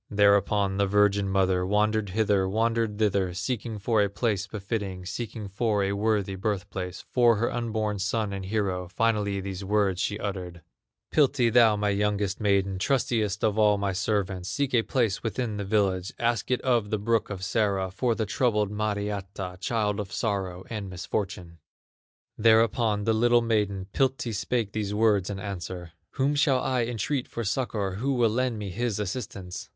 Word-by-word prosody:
Thereupon 100 -1 +3
the 100 0 +2
virgin 100 0 +3
mother 95 -1 +2
Wandered 105 +2 +1
hither, 100 -1 +1
wandered 115 0 0
thither, 100 -4 +1
Seeking 115 +1 -3
for 110 +1 +1
a 100 - +2
place 100 -1 -1
befitting, 100 -3 -4
Seeking 110 +1 -5
for 105 +1 0
a 100 - 0
worthy 100 -1 0
birth 95 +1 -2
place 90 -1 -5
For 120 -2 +5
her 115 +3 -1
unborn 110 -3 -2
son 105 +1 -1
and 100 -1 -4
hero; 95 -3 -1
Finally 100 0 0
these 95 0 -5
words 100 -2 +1
she 105 - -1
uttered 90 -4 -5 0.5
"Piltti, 130 -6 +3
thou 115 -3 +6
my 105 0 0
youngest 100 -1 0
maiden, 100 -2 +1
Trustiest 110 -4 0
of 110 0 +2
all 105 -1 +5
my 100 -1 -1
servants, 95 -2 -1
Seek 140 +2 -1
a 120 - +5
place 115 -4 0
within 115 -1 -2
the 100 - -3
village, 95 -2 0
Ask 120 -3 0
it 125 - +1
of 120 -5 +1
the 110 - 0
brook 115 +2 0
of 95 -2 -5
Sara, 100 -3 0
For 115 +4 0
the 110 - -1
troubled 105 -1 +1
Mariatta, 100 -3 -3
Child 105 0 0
of 100 -1 -5
sorrow 95 -6 -2
and 105 -4 -5
misfortune." 90 -2 -4 0.8
Thereupon 110 -1 +3
the 110 - +2
little 120 +1 +4
maiden, 105 -4 0
Piltti, 130 -3 0
spake 110 0 -1
these 105 -1 -2
words 105 -4 +3
in 100 - -4
answer: 90 -3 -6 0.2
"Whom 140 +1 +1
shall 145 -3 +3
I 125 -2 0
entreat 120 +3 -2
for 115 - -4
succor, 100 -3 -2
Who 135 +5 0
will 115 -3 +3
lend 125 0 0
me 105 -2 -5
his 115 +1 -1
assistance?" 100 -3 -5
105 Hz, 170 wpm, -27 LUFS, 95-115 Hz, 0.8 s, thou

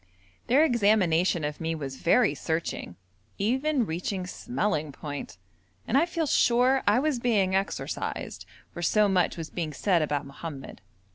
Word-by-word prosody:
Their 280 +6 +5
examination 190 - +2
of 150 +1 -4
me 165 0 -1
was 135 -4 -6
very 240 - +3
searching, 160 - -3 0.4
even 260 +5 +1
reaching 180 +2 -3
smelling 180 - -2
point, 145 - -7 0.5
and - - 0
I 310 +5 +4
feel 335 -2 -1
sure 255 -1 +3
I 205 +3 +5
was 280 -1 +1
being 210 -6 +1
exorcised, 195 +1 -3 0.2
for 175 - -7
so 210 +4 +3
much 185 -4 +1
was 165 -1 -6
being 160 -4 -3
said 175 +3 +2
about 145 -2 -1
Mohammed. 140 0 -8
190 Hz, 145 wpm, -27 LUFS, 160-240 Hz, 0.5 s, Their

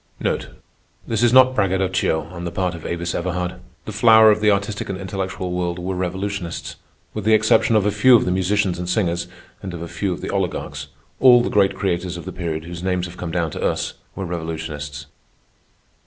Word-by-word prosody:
This 110 -1 -1
is 120 -1 +4
not 130 0 +7
braggadocio 95 -6 +1
on 85 -1 -7
the 85 - -2
part 90 0 -1
of 85 -3 -7
Avis 85 0 -3
Everhard. 90 0 -3 0.3
The - - -5
flower 110 -1 +7
of 105 0 0
the 105 - +4
artistic 100 0 -1
and 95 - -3
intellectual 95 -1 -4
world 90 -1 -2
were 90 +2 -3
revolutionists. 95 0 -4 0.4
With 105 - -4
the 110 +1 +5
exception 110 +1 +3
of 105 -2 +3
a 105 - +2
few 115 +5 +6
of 115 - +4
the 90 - 0
musicians 95 0 +1
and 90 0 -4
singers, 85 -3 0 0.3
and 95 -3 -6
of 85 - -6
a - - -6
few 95 +3 -2
of 90 - -4
the - - -4
oligarchs, 95 -3 -3 0.3
all 125 -2 +7
the - - -2
great 100 -2 +3
creators 90 -2 -2
of 85 - -9
the - - -5
period 80 -3 -4
whose 85 0 -8
names 90 -1 -1
have 90 0 -10
come 90 - -5
down 85 -2 -1
to - - -6
us, - - -1 0.2
were 95 - -4
revolutionists. 80 -4 -5
90 Hz, 200 wpm, -21 LUFS, 85-100 Hz, 0.4 s, not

